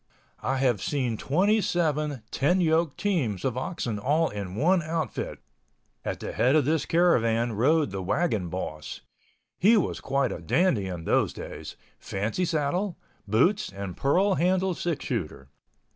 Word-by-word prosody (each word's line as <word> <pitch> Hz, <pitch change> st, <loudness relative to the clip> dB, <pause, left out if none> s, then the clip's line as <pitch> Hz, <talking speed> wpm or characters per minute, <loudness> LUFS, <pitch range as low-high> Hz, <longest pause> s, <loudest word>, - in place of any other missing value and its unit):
I 135 Hz, -, 0 dB
have 125 Hz, -6 st, +1 dB
seen 130 Hz, -6 st, -1 dB
27 155 Hz, -, +1 dB
ten 175 Hz, +7 st, +2 dB
yoke 160 Hz, -3 st, +2 dB
teams 140 Hz, -, -1 dB
of 130 Hz, -3 st, 0 dB
oxen 125 Hz, -, -3 dB
all 150 Hz, +8 st, +2 dB
in 100 Hz, -3 st, -6 dB
one 175 Hz, -, +3 dB
outfit. 160 Hz, -5 st, -3 dB, 0.7 s
At -, -, -3 dB
the -, -, -4 dB
head 130 Hz, +4 st, +2 dB
of 155 Hz, -, +4 dB
this 155 Hz, +1 st, 0 dB
caravan 120 Hz, -9 st, +3 dB
rode 145 Hz, +3 st, +2 dB
the 95 Hz, 0 st, -4 dB
wagon 105 Hz, -, 0 dB
boss. 75 Hz, -4 st, -5 dB, 0.6 s
He 220 Hz, +5 st, +6 dB
was 200 Hz, -, -1 dB
quite 135 Hz, -1 st, 0 dB
a -, -, -5 dB
dandy 110 Hz, -, +2 dB
in 90 Hz, -3 st, -5 dB
those -, -, +1 dB
days—fancy 110 Hz, -, -5 dB
saddle, 170 Hz, +4 st, -1 dB, 0.3 s
boots 175 Hz, -, +2 dB
and 100 Hz, -2 st, -6 dB
pearl 190 Hz, +9 st, +2 dB
handle 185 Hz, +1 st, +1 dB
six 170 Hz, -3 st, -3 dB
shooter. 80 Hz, -, -4 dB
140 Hz, 145 wpm, -27 LUFS, 110-175 Hz, 0.7 s, He